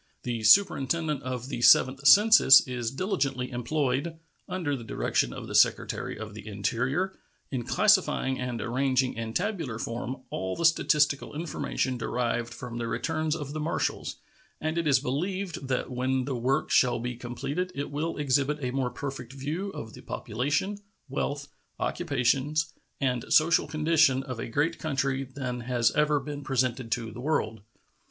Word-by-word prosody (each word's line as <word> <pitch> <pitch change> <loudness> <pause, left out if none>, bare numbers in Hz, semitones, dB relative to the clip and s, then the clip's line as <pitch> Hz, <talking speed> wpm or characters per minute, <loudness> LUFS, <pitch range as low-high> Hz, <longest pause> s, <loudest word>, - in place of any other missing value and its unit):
The 120 -2 -3
Superintendent 155 - +3
of 130 0 -5
the 120 -4 -4
Seventh 135 +3 +5
Census 210 -10 +8
is 120 -3 -2
diligently 135 - -2
employed, 140 +4 -1 0.3
under 165 -6 -1
the 120 - -7
direction - - 0
of - - -7
the - - -7
Secretary - - +2
of 110 0 -7
the 105 0 -10
Interior, 125 - -1 0.4
in 130 -3 -2
classifying 190 - +2
and 125 -2 -3
arranging 130 +1 +1
in 115 0 -5
tabular 175 - -2
form 120 +3 -5
all 95 0 -3
the 170 - -1
statistical 150 -3 +2
information 145 -5 -2
derived 120 0 -1
from 120 0 -7
the 115 - -2
returns 155 +4 -1
of 145 -3 -6
the 155 - -4
marshals, 155 +2 -2 0.4
and 155 +1 -2
it 165 - -1
is 140 -2 +5
believed 160 +4 -3
that 130 0 -2
when 130 +1 0
the 135 -1 -2
work 130 +5 0
shall 125 -1 +4
be 120 +1 -4
completed 135 +9 -4
it 140 +1 -4
will 155 +3 -2
exhibit 140 0 +1
a 125 -3 -2
more 130 -1 -1
perfect 135 -2 -6
view 150 +9 -4
of 110 - -8
the - - -11
population, 145 - -2 0.3
wealth, 140 +1 -3 0.3
occupations, 145 +1 0 0.3
and 125 -3 -1
social 160 +1 +4
condition 155 -4 +3
of 130 -4 -6
a - - -4
great 150 +7 0
country 140 -3 -1
than 130 -2 -5
has 120 -1 +1
ever 150 -1 +2
been 145 +1 -6
presented 130 -3 -1
to 115 -2 -2
the 120 - -8
world. 120 -7 -1
135 Hz, 160 wpm, -28 LUFS, 125-155 Hz, 0.4 s, Census